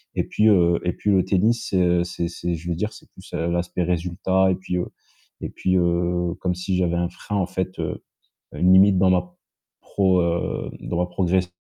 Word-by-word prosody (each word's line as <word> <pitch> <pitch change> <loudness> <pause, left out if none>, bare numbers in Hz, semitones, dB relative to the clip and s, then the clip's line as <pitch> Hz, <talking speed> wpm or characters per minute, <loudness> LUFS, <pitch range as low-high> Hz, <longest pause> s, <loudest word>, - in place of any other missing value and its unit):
et - - +1
puis, 105 - +1
heu 85 -4 +4
et 90 - +1
puis 105 - -3
le 95 -2 +4
tennis, 110 +5 +1
c'est, 95 -2 +1
heu, 90 0 +3
c'est 85 -1 -3
c'est 85 0 -4
je 85 +2 -7
vais 85 - -1
dire, 105 +6 -2
c'est - - -15
plus, - - -16
heu, 85 - -1
l'aspect 85 +1 -1
résultat 90 +2 +1
et - - +1
puis, 90 -1 -4
heu 90 - -2 0.5
et - - -4
puis, 95 0 -1
heu, 85 0 0
comme 90 -1 -1
si 90 +1 -2
j'avais 85 -2 +1
un 85 0 0
frein, 105 - -7
en 95 - +1
fait, 95 0 -4
heu, - - -4 0.5
une 90 +1 +3
limite 95 0 +6
dans 95 0 +4
ma 90 -1 0 0.5
pro 95 -2 +1
heu, 85 0 -2
dans 85 - -4
ma 90 - +1
progression 90 0 0
90 Hz, 215 wpm, -23 LUFS, 85-95 Hz, 0.5 s, limite